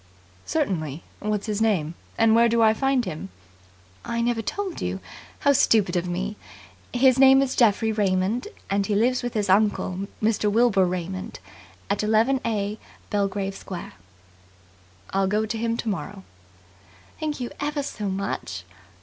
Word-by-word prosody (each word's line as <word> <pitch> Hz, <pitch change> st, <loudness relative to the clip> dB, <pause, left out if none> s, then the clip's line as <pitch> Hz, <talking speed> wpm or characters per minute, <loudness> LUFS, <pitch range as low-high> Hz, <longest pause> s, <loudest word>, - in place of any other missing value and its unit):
"Certainly. 170 Hz, -, -1 dB, 0.2 s
What 210 Hz, -1 st, -1 dB
is -, -, -9 dB
his 215 Hz, -1 st, -2 dB
name, 180 Hz, -8 st, +1 dB, 0.2 s
and 225 Hz, -1 st, +5 dB
where 235 Hz, +1 st, +5 dB
do 235 Hz, +1 st, +2 dB
I 220 Hz, 0 st, +6 dB
find 270 Hz, +1 st, +1 dB
him?" 155 Hz, -11 st, -6 dB, 0.7 s
"I 235 Hz, 0 st, -3 dB
never 235 Hz, -1 st, +1 dB
told 390 Hz, -, -4 dB
you. 90 Hz, +1 st, -2 dB, 0.4 s
How 285 Hz, -, +5 dB
stupid 210 Hz, -8 st, +3 dB
of 175 Hz, 0 st, 0 dB
me. 195 Hz, +4 st, -3 dB, 0.5 s
His 255 Hz, +1 st, +4 dB
name 270 Hz, 0 st, +8 dB
is 265 Hz, -1 st, -2 dB
Geoffrey 225 Hz, -2 st, +3 dB
Raymond, 205 Hz, -, 0 dB, 0.2 s
and 200 Hz, 0 st, 0 dB
he 210 Hz, -, 0 dB
lives 245 Hz, +4 st, +2 dB
with 245 Hz, -1 st, -4 dB
his 210 Hz, -2 st, 0 dB
uncle, 195 Hz, -1 st, +1 dB
Mr. 215 Hz, -1 st, +1 dB
Wilbur 215 Hz, -4 st, +4 dB
Raymond, 185 Hz, +1 st, -4 dB, 0.5 s
at 200 Hz, -, 0 dB
11a, 220 Hz, -1 st, +1 dB, 0.3 s
Belgrave 195 Hz, -1 st, -1 dB
Square." 180 Hz, -, -7 dB, 1.2 s
"I'll 195 Hz, 0 st, +1 dB
go 210 Hz, +3 st, +1 dB
to 220 Hz, -, -3 dB
him 230 Hz, 0 st, 0 dB
tomorrow." 200 Hz, -3 st, -4 dB, 1.0 s
"Thank 305 Hz, -2 st, -3 dB
you 245 Hz, -1 st, -4 dB
ever 290 Hz, 0 st, -1 dB
so 210 Hz, -7 st, -4 dB
much." 190 Hz, -, -3 dB
210 Hz, 150 wpm, -24 LUFS, 195-235 Hz, 1.2 s, name